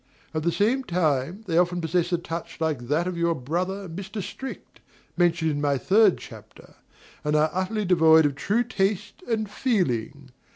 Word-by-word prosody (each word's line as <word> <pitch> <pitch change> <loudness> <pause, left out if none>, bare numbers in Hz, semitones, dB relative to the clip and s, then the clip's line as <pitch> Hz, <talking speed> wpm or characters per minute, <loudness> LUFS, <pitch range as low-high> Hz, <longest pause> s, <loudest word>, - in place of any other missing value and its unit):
At 155 - -1
the 170 +2 +1
same 235 +9 +1
time, 170 - 0
they 170 -3 +2
often 175 0 +1
possess 175 +1 0
a 175 - +2
touch 170 0 -6
like 150 -7 -2
that 155 +6 +1
of 180 -2 -3
your 170 0 +2
brother, 180 +9 -3
Mr. 195 +5 -6
Strict, 265 +7 -8 0.4
mentioned 170 -2 +2
in 145 0 -2
my 140 -1 +1
third 200 - +4
chapter, - - -13 0.5
and 150 0 0
are 155 +1 +3
utterly 200 +3 -1
devoid 160 -3 +6
of 145 - +1
true 210 - 0
taste 205 - -2
and 220 -2 0
feeling. 145 - -1
175 Hz, 170 wpm, -25 LUFS, 155-195 Hz, 0.5 s, devoid